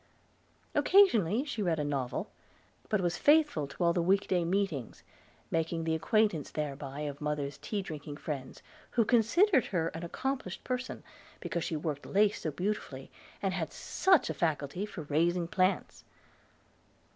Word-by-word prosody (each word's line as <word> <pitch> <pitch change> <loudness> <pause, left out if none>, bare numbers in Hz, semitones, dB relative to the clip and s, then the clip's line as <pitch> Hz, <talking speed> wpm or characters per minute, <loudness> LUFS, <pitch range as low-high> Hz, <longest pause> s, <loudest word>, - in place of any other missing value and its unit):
Occasionally 280 - +4
she 280 -7 -4
read 170 -5 +1
a 150 - -1
novel; 140 -4 -2 0.6
but 210 -3 +2
was 175 -1 -1
faithful 295 - +4
to 140 - -4
all 170 0 +4
the 175 - +1
week 195 +4 +2
day 180 -2 +2
meetings, 170 - -2 0.5
making 165 0 0
the 160 0 0
acquaintance 175 -2 +1
thereby 140 -1 -4
of 145 -1 -5
mother's 145 -1 -2
tea 200 +7 -3
drinking 150 -4 -7
friends, 140 -4 -6 0.3
who 230 - +5
considered 255 - +4
her 165 -3 0
an 165 - -7
accomplished 255 +2 -3
person, 255 0 -4 0.4
because 170 - -3
she 160 - -2
worked 150 -2 -3
lace 205 +1 +2
so 160 - -1
beautifully, 175 -5 -4 0.3
and 195 -1 +1
had 170 -4 -3
such 380 -1 +2
a - - -2
faculty 160 +4 -1
for 175 -6 -7
raising 170 +4 +1
plants! 185 +2 0
170 Hz, 150 wpm, -31 LUFS, 150-210 Hz, 0.6 s, who